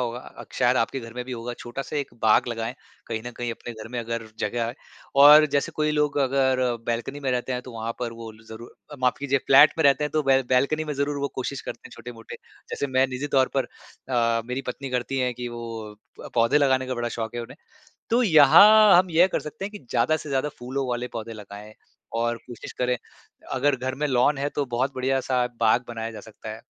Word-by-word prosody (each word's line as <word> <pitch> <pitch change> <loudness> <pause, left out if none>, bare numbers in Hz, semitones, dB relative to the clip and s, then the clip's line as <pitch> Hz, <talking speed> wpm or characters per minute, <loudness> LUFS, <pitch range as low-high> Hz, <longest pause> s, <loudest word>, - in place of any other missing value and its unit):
होगा, 120 0 -6
शायद 125 +1 +2
आपके 130 +3 0
घर 115 -1 -10
में 125 0 -5
भी 130 - -7
होगा 120 0 -5
छोटा-सा 135 +5 -6
एक 140 -2 -2
बाग 110 -1 +4
लगाएँ 115 +1 -4 0.3
कहीं 110 -1 -4
न - - -4
कहीं 120 -1 -3
अपने 120 - -8
घर 110 -1 -10
में 125 - -3
अगर 115 -1 -4
जगह 120 0 -2 0.5
और 150 +1 +9
जैसे 140 - 0
कोई 150 0 +1
लोग 150 -1 0
अगर 130 -1 +2 0.3
बालकनी 120 +5 -3
में 135 -2 -1
रहते 125 +1 -1
हैं 125 0 -3
तो 125 - -11
वहाँ 115 0 -4
पर 120 -2 -3
वो 115 -1 -9 0.2
ज़रूर 110 +2 -10 0.2
अ, - - -6
माफ़ 125 -1 +2
कीजिए 140 -1 0
फ्लैट 140 +3 +7
में 160 - +2
रहते 140 +1 +4
हैं 150 - -3
तो 155 - 0
बैल 135 -1 +3
बैलकनी 140 +5 +2
में 150 - -4
ज़रूर 140 +1 -1
वो 140 - -1
कोशिश 130 +1 -4
करते - - -7
हैं, - - -16
छोटे-मोटे 115 -2 -10 0.4
जैसे - - -2
मैं 130 0 +2
निज़ी 130 +2 -4
तौर 130 -1 +4
पर 135 - +2 0.4
अ, 115 -2 +1
मेरी 125 +3 -4
पत्नी 135 +2 -5
करती 125 +2 -2
है 125 -1 0
कि 120 0 -6
वो 115 -3 -7 0.4
पौधे 115 +4 +4
लगाने 130 -2 +2
का 130 - -3
बड़ा 120 -1 -2
शौक़ 115 0 -5
है - - -2
उन्हें। 115 - -11 0.5
तो 240 +1 +3
यहाँ 200 - +8
हम 185 +1 +3
यह 170 +2 +5
कर - - -2
सकते 150 +6 -7
हैं 205 - -6
कि 210 - -9
ज़्यादा 130 +6 +2
से 155 - -9
ज़्यादा 135 +1 0
फूलों 130 +2 -3
वाले 120 0 -2
पौधे 115 0 -6
लगाएँ 105 0 -11 0.4
और 120 0 0
कोशिश 120 -2 -9
करें, 125 0 -1 0.5
अगर 140 +2 +2
घर 130 +1 -4
में - - +2
लॉन 130 +2 +2
है 140 +1 -1
तो 145 - +1
बहुत 130 +2 -1
बढ़िया 130 +1 0
सा 125 -2 0
बाग 115 +2 +3
बनाया 115 -1 -5
जा 110 - -9
सकता 110 +1 -11
है। 110 - -6
125 Hz, 225 wpm, -24 LUFS, 115-140 Hz, 0.5 s, और